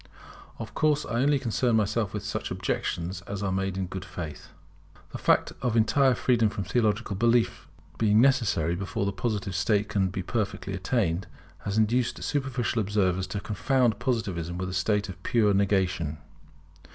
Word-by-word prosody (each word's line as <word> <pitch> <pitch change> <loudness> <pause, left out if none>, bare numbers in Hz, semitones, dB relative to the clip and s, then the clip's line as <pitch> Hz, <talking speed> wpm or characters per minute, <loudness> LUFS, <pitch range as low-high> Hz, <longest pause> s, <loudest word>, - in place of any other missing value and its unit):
Of - - -7
course 150 -1 +2
I 120 0 -1
only 145 +1 +3
concern 120 -1 +1
myself 105 -1 +1
with 105 -3 -5
such - - -3
objections 90 +1 -2
as 100 0 -4
are 100 - 0
made 95 0 -1
in 95 - -1
good 95 0 -6
faith. 90 -5 -7 0.6
The - - -6
fact - - +2
of 120 -2 0
entire 130 +3 +4
freedom 115 -4 +2
from 100 - -4
theological 110 0 0
belief 115 +3 +2 0.3
being 110 -1 +4
necessary 115 - +3
before 100 +2 -2
the 100 - 0
Positive 100 -2 -2
state 100 +3 +1
can 100 -2 +1
be 95 0 -4
perfectly 100 -2 -2
attained, 95 -2 0 0.4
has 100 +1 -1
induced 115 +3 +1
superficial 130 -5 -1
observers 95 -3 0
to 100 +2 -3
confound 115 +2 +1
Positivism 100 -9 -2
with 90 0 -3
a - - -5
state 100 +3 +1
of 95 -1 -9
pure 105 -1 +2
negation. 95 -6 +1
105 Hz, 165 wpm, -27 LUFS, 95-115 Hz, 0.6 s, entire